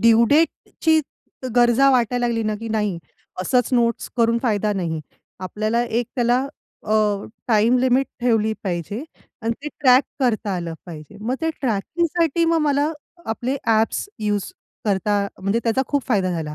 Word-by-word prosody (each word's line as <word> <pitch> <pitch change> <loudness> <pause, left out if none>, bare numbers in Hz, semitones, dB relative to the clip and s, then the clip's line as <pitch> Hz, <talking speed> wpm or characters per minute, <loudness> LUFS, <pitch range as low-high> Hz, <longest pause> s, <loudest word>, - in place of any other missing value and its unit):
Due 230 0 +6
डेटची 320 +1 +2 0.6
गरजा 240 +3 +5
वाटायला 245 -1 +2
लागली 230 -1 0
ना - - -1
की 230 - -5
नाही 210 -5 -1 0.4
असंच 245 +6 +2
नोट्स 235 -1 +1
करून 230 0 +3
फायदा 210 -3 +1
नाही. 170 -5 -2 0.4
आपल्याला 215 +5 -1
एक 235 0 -1
त्याला 245 0 +3 0.5
अ, 215 - -2 0.6
टाईम 225 +2 +4
लिमिट 260 +1 +3
ठेवली 225 -3 +2
पाहिजे. 190 - -3 0.4
आणि 230 +1 0
ते 300 - -3
ट्रॅक 255 0 +6 0.2
करता 220 -6 +1
आलं 170 -2 -4
पाहिजे. 155 -4 -10
मग 240 +5 -1
ते 325 - 0
ट्रॅकिंगसाठी 330 - 0
मग 330 0 +3
मला 290 0 +2 0.4
आपले 245 +5 -2
ॲप्स 225 - +1
यूज 205 -2 -2 0.3
करता 205 0 +1
म्हणजे 200 +4 0
त्याचा 235 +3 +2
खूप 285 -2 0
फायदा 190 -6 +2
झाला. 160 -3 -3
230 Hz, 150 wpm, -22 LUFS, 210-255 Hz, 0.6 s, Due